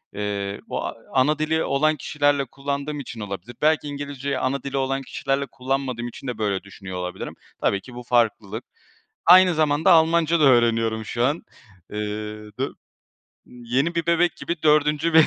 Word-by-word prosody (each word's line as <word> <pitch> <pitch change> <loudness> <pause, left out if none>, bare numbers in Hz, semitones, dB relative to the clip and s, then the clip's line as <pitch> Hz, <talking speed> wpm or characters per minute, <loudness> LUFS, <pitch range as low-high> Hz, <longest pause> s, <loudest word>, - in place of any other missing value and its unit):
Eee, 100 -1 -3
o - - -3 0.2
ana 150 +4 +3
dili 160 +1 +1
olan 155 +3 +2
kişilerle 145 0 +1
kullandığım 140 +3 -4
için 115 -4 -7
olabilir. 100 +3 -6
Belki 155 -1 +3
İngilizceyi 140 -1 -4
ana 135 0 -1
dili 140 0 -3
olan 135 0 0
kişilerle 135 +1 -2
kullanmadığım 130 -2 -2
için 130 +2 -9
de 120 -3 -3
böyle 100 -3 -1
düşünüyor 95 -2 -8
olabilirim. 90 0 -5 0.3
Tabii 100 0 +1
ki 125 -2 -13
bu 125 - -7
farklılık. 115 -2 0 0.6
Aynı 180 0 +8
zamanda 155 +3 +3
Almanca 165 0 +4
da - - +5
öğreniyorum 115 -3 +3
şu 120 +2 -1
an. 145 +5 +1 0.5
Eee 105 - -4 0.6
dö - - 0 0.8
yeni 125 +7 -2
bir 165 -1 0
bebek 170 +1 +2
gibi 170 -2 -4
4. 150 +1 +3
bir 160 -1 +8
135 Hz, 155 wpm, -23 LUFS, 120-155 Hz, 0.8 s, Aynı